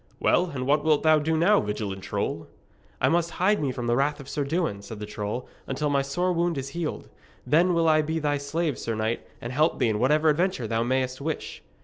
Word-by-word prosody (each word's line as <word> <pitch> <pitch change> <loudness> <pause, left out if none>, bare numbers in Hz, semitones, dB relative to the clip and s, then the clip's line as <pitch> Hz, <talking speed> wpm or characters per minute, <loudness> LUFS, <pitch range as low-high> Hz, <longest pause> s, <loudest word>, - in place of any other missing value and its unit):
'Well, 180 - +3
and 130 -5 -4
what 145 +2 +2
wilt 155 -2 +3
thou 155 -1 +5
do 160 +2 0
now, 200 +6 +4
valiant 105 -2 -4
troll?' - - -3 0.5
'I - - +4
must 170 0 +2
hide 205 +2 +2
me 140 -3 0
from 125 -1 -5
the 120 0 +2
wrath 145 +3 +1
of 135 - -10
Sir 145 +1 -2
Dewin,' 155 - -1
said 110 +2 -8
the 105 - -5
troll, 105 +3 -4 0.2
'until 145 +2 -1
my 140 -1 +3
sore 175 +7 0
wound 170 -2 0
is 135 0 -4
healed. 165 +1 -4 0.4
Then 175 +4 +3
will 165 -1 +2
I 155 -1 +5
be 160 +2 -2
thy 145 -2 0
slave, 150 +1 -2
sir 115 - -3
knight, 110 +2 -1 0.2
and 120 +2 -6
help 155 +5 +2
thee 125 -4 +2
in 105 -1 0
whatever 150 +6 +3
adventure 165 -4 +1
thou 115 +1 0
mayst 130 +2 -1
wish!' 155 +2 -4
145 Hz, 230 wpm, -26 LUFS, 125-160 Hz, 0.5 s, thou